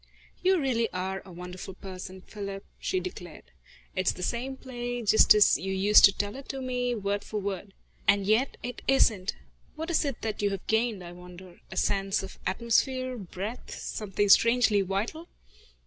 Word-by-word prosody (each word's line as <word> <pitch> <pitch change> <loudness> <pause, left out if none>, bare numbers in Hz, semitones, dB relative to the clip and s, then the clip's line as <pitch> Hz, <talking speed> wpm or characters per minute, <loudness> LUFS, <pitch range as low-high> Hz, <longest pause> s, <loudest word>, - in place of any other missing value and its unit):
"You 375 0 +3
really 240 -5 +1
are 190 +1 -3
a 190 - -12
wonderful 180 +2 -8
person, 185 0 -8
Philip," 200 -1 -7
she 185 - -1
declared. 175 -2 -8 0.5
"It's 185 0 +2
the 180 - -7
same 255 +6 -2
play, 245 -2 -5
just 215 0 +6
as 210 - +5
you 190 - -3
used 200 +2 +7
to 200 - +6
tell 205 +2 -3
it 270 0 -7
me, 250 -2 -2
word 205 -1 -2
for 215 - -4
word. 195 -1 -5 0.3
And 200 -1 +4
yet 220 +6 +2
it 245 +1 -5
isn't. 210 -7 +3 0.4
What 320 +2 -4
is 335 - +2
it 280 -5 -4
that 215 -2 -3
you 205 - +2
have 195 -2 -5
gained, 220 -3 0
I 175 - -8
wonder? 180 0 -13
a - - -7
sense 195 0 +1
of 195 - -9
atmosphere, 255 +5 +1
breadth, 205 +2 -6
something 205 -1 -2
strangely 230 0 +5
vital." 205 - -3
205 Hz, 170 wpm, -28 LUFS, 190-245 Hz, 0.5 s, used